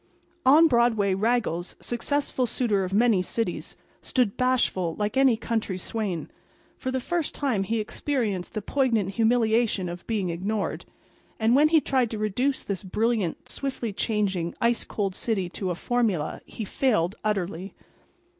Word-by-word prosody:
On 310 +5 +8
Broadway 235 -7 +3
Raggles, 195 -4 0
successful 260 +1 -1
suitor 215 -5 +1
of 185 - -4
many 215 -1 +4
cities, 185 +1 -3 0.3
stood, 245 -6 +1
bashful, 240 -10 +1
like 210 0 -2
any 265 -4 +4
country 220 -5 -2
swain. 190 -3 -3 0.4
For 260 - -4
the 260 0 0
first 335 +4 -2
time 260 -9 0
he 220 +4 -1
experienced 215 -4 -2
the 215 - -2
poignant 230 -7 +1
humiliation 225 -2 +2
of 175 0 -7
being 205 -6 -1
ignored. 195 +4 -2 0.5
And 225 +2 +4
when 295 +3 +6
he 320 -1 +5
tried 260 -5 +1
to 220 - -4
reduce 245 +6 0
this 200 -2 -4
brilliant, 215 -1 -1
swiftly 255 -6 -3
changing, 195 -6 -1
ice 235 0 +2
cold 200 -3 -2
city 195 -4 -1
to 185 +1 -4
a 175 - -1
formula 210 -8 -1
he 220 - -6
failed 200 -6 +1
utterly. 195 -3 -2
220 Hz, 145 wpm, -26 LUFS, 190-245 Hz, 0.5 s, On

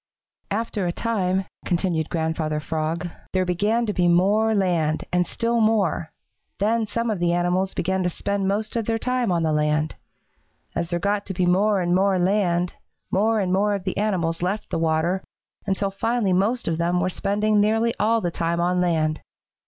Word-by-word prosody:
"After 210 -3 -2
a - - 0
time," 190 -3 -1 0.2
continued 170 -3 0
Grandfather 160 -2 -1
Frog, 160 +3 -2 0.3
"there 185 -1 +2
began 205 +7 +1
to 210 - -1
be 180 -2 +2
more 205 +6 +3
land 170 -6 +1
and 180 -1 +2
still 235 0 0
more. 205 -7 +1 0.5
Then 220 +2 +1
some 230 +1 -1
of 205 - -2
the 175 0 +2
animals 180 +2 0
began 190 +2 0
to 180 - +1
spend 200 +2 -2
most 210 +3 -1
of 230 -2 -1
their 225 0 +1
time 250 -2 0
on 170 -2 +1
the 160 -1 +1
land. 150 0 +1 0.8
As 170 0 -2
there 175 - 0
got 200 +3 -1
to 190 - -4
be 180 - +1
more 195 +3 +3
and 175 0 +1
more 190 +1 +3
land, 180 -2 +1 0.4
more 220 +3 +2
and 185 -2 0
more 205 +2 +2
of 195 - -5
the 185 - -3
animals 180 -6 0
left 190 +4 -2
the - - 0
water, 165 +3 +1 0.4
until 195 0 0
finally 220 0 0
most 215 +7 +1
of 165 0 -1
them 175 +1 +1
were 180 - +1
spending 205 +3 +1
nearly 225 +2 +2
all 225 +2 +3
of 225 - -3
the 175 - 0
time 170 +1 -1
on 180 +1 +1
land. 155 -3 +1
185 Hz, 190 wpm, -23 LUFS, 170-210 Hz, 0.8 s, more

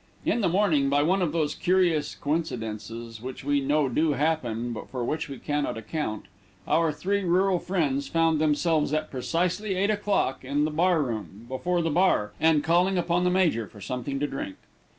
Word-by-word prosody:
In 235 - +1
the 195 - +2
morning, 170 -7 +2
by 145 +1 +3
one 185 +5 +2
of 170 -4 +1
those 155 -3 0
curious 175 -5 +1
coincidences 115 -7 -4
which 130 +2 -7
we 145 0 +1
know 145 +1 +2
do 150 +5 +1
happen, 120 -7 -1
but 110 - -8
for 125 -2 -3
which 160 +3 -2
we 135 - -6
cannot 145 -5 -2
account, 110 - -4 0.4
our 165 -1 +3
three 200 +6 -1
rural 185 +1 +2
friends 145 -8 -1
found 165 -2 +2
themselves, 155 0 +2
at 155 - -2
precisely 180 +10 -1
eight 200 +3 +2
o'clock, 205 -11 0
in 145 +3 0
the 155 - -1
bar 165 0 +2
room, 110 -3 -6
before 170 +7 -1
the 165 - 0
bar, 145 - +2
and 160 -2 +3
calling 175 +4 +3
upon 175 +1 +1
the - - +4
major 170 - +2
for 105 - -15
something 125 +6 -4
to 145 - 0
drink. 135 -9 -5
155 Hz, 185 wpm, -26 LUFS, 130-175 Hz, 0.4 s, the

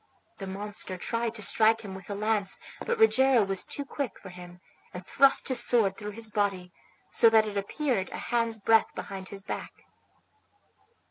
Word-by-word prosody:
The 195 - -6
monster 200 -1 -5
tried 230 +4 -2
to 215 - -2
strike 220 +2 +3
him 200 -3 -8
with 190 +2 -11
a 200 - -3
lance, 210 -1 -1 0.2
but 475 - -1
Rogero 265 - +5
was 195 -2 -2
too 285 - -5
quick 275 -5 -4
for - - -11
him, 180 0 -12 0.4
and 180 0 -8
thrust 275 +4 +3
his 260 -2 +4
sword 210 -6 +2
through 210 0 -7
his 225 -1 -5
body, 195 -4 -1 0.4
so 230 - +5
that 220 -1 +4
it 210 -1 -6
appeared 200 +1 -2
a - - -7
hand's 230 -2 -1
breadth 225 +2 +3
behind 190 -1 -7
his 195 -1 -9
back. - - -7
210 Hz, 180 wpm, -28 LUFS, 195-230 Hz, 0.4 s, Rogero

